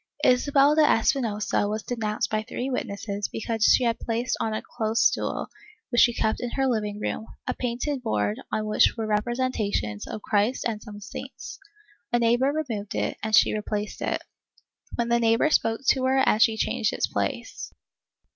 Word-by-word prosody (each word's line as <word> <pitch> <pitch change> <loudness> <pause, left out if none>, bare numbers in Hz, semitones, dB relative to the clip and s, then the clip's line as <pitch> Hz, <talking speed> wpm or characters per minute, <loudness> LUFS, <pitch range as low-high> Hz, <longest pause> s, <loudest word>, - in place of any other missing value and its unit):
Isabel 275 +3 +4
de 310 - +4
Espinosa 225 -7 +2
was 215 +1 -3
denounced 215 -2 -2
by 215 0 +1
three 245 +4 -4
witnesses 200 -3 -3
because 225 0 -1
she - - +5
had 235 -1 +1
placed 235 +2 -1
on 225 - -1
a 215 - -3
close 220 +1 -2
stool, - - +1 0.4
which 240 - +4
she 240 - +6
kept 220 -1 -1
in 245 - -2
her 270 - +1
living 210 -5 -1
room, 220 +1 -3 0.2
a - - -1
painted 255 +3 -2
board 105 - -1
on 215 - -1
which 215 +2 +3
were 225 - -2
representations 210 - -1
of 215 - -6
Christ 210 +4 +1
and 215 -2 -4
some 205 -2 -10
saints. - - -8 0.5
A 240 - +3
neighbor 240 +3 +3
removed 230 -10 -4
it - - -1
and 220 -1 +2
she 220 - +5
replaced 210 0 -3
it, - - -2 0.7
when 235 0 -1
the 235 0 +3
neighbor 230 +6 +3
spoke 225 -3 +2
to 260 -1 +3
her 265 +1 +2
and 215 - +3
she 225 -1 +4
changed 230 -1 0
its - - 0
place. - - -4
225 Hz, 175 wpm, -25 LUFS, 210-245 Hz, 0.7 s, she